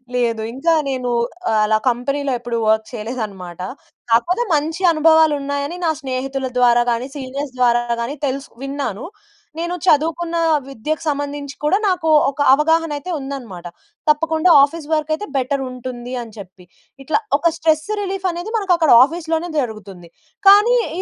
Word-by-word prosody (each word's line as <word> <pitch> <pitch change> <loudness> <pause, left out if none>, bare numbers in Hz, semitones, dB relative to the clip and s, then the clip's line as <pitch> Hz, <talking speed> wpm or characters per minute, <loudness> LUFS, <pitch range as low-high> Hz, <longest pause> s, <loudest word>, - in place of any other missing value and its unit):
లేదు. 230 -2 0
ఇంకా 330 +6 +1
నేనూ 255 -2 -2 0.4
ఆహ్, 220 - +2
అలా 215 0 +2
కంపెనీలో 275 +3 -2
ఎప్పుడు 240 -1 -3
వర్క్ 220 0 +2
చెయలేదనమాట. 210 -7 -6 0.5
కాకపోతే, 350 - +2
మంచి 315 +4 -1
అనుభవాలున్నాయని 305 -1 +2
నా - - +2
స్నేహితుల 265 0 -3
ద్వారా 240 -1 +4
గానీ, 235 +2 -2
సీనియర్స్ 275 0 -5
ద్వారా 240 -1 +3 0.2
గానీ 245 +5 -3
తెలుస్ 275 0 -3 0.2
విన్నాను. 275 -6 -4 0.6
నేను 345 +1 -2
చదువుకున్నా 330 +1 +1 0.3
విద్యకు 275 +5 -4
సంబంధించి 285 -1 -3
కూడా 300 +6 +3
నాకూ 360 -4 0 0.2
ఒక 280 +1 -5
అవగాహనయితే 315 +1 +1
ఉందనమాట. 250 -10 -7 0.4
తప్పకుండా 320 +3 +2
ఆఫీస్ 295 +1 -2
వర్కయితే 310 +5 -1
బెటరుంటుంది 255 -2 -3
అని 230 -2 -9
చెప్పి. 185 -2 -12 0.4
ఇట్లా 290 - +1 0.2
ఒక 335 - +2
స్ట్రెస్స్ 315 +1 +1
రిలీఫనేది 375 -1 -3
మనకక్కడ 355 -7 +2
ఆఫీస్‌లోనే 325 +3 -2
జరుగుతుంది, 200 -8 -6 0.4
కానీ 415 +5 +7 0.2
ఈ - - 0
280 Hz, 130 wpm, -19 LUFS, 245-320 Hz, 0.6 s, కానీ